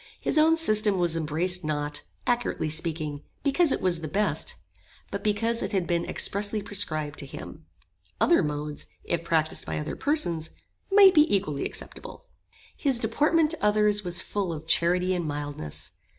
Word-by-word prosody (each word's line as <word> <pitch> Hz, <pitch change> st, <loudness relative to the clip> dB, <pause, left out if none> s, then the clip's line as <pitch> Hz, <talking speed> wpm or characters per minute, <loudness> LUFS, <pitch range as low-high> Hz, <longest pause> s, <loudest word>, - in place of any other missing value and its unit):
His -, -, +2 dB
own 320 Hz, +1 st, +5 dB
system 215 Hz, -, +4 dB
was 175 Hz, -2 st, +1 dB
embraced 165 Hz, +3 st, 0 dB
not, 150 Hz, -1 st, -2 dB, 0.2 s
accurately 240 Hz, -10 st, -1 dB
speaking, 155 Hz, -2 st, -3 dB, 0.2 s
because 290 Hz, +2 st, +3 dB
it -, -, -1 dB
was 175 Hz, -3 st, +1 dB
the 160 Hz, -, -4 dB
best, 205 Hz, +7 st, -1 dB, 0.6 s
but 200 Hz, -, -4 dB
because 225 Hz, +3 st, 0 dB
it 195 Hz, +2 st, -3 dB
had 190 Hz, -3 st, +1 dB
been 170 Hz, 0 st, -1 dB
expressly 205 Hz, +1 st, 0 dB
prescribed 155 Hz, -7 st, -1 dB
to 140 Hz, -, -2 dB
him. -, -, -10 dB, 0.5 s
Other 345 Hz, -, +4 dB
modes, 150 Hz, -1 st, -4 dB, 0.2 s
if 170 Hz, -1 st, -2 dB
practised 160 Hz, -1 st, 0 dB
by -, -, -3 dB
other 150 Hz, 0 st, -4 dB
persons, 175 Hz, -, 0 dB, 0.4 s
might 390 Hz, -1 st, +8 dB
be 305 Hz, -2 st, +4 dB
equally 190 Hz, -8 st, 0 dB
acceptable. -, -, -8 dB, 0.5 s
His 275 Hz, -4 st, +2 dB
deportment 300 Hz, +8 st, +2 dB
to 325 Hz, -, -5 dB
others 210 Hz, 0 st, +3 dB
was 175 Hz, -1 st, 0 dB
full 200 Hz, -4 st, -3 dB
of 160 Hz, -1 st, -7 dB
charity 180 Hz, +3 st, +2 dB
and 175 Hz, -3 st, -2 dB
mildness. 145 Hz, -, -5 dB
180 Hz, 160 wpm, -26 LUFS, 155-220 Hz, 0.6 s, might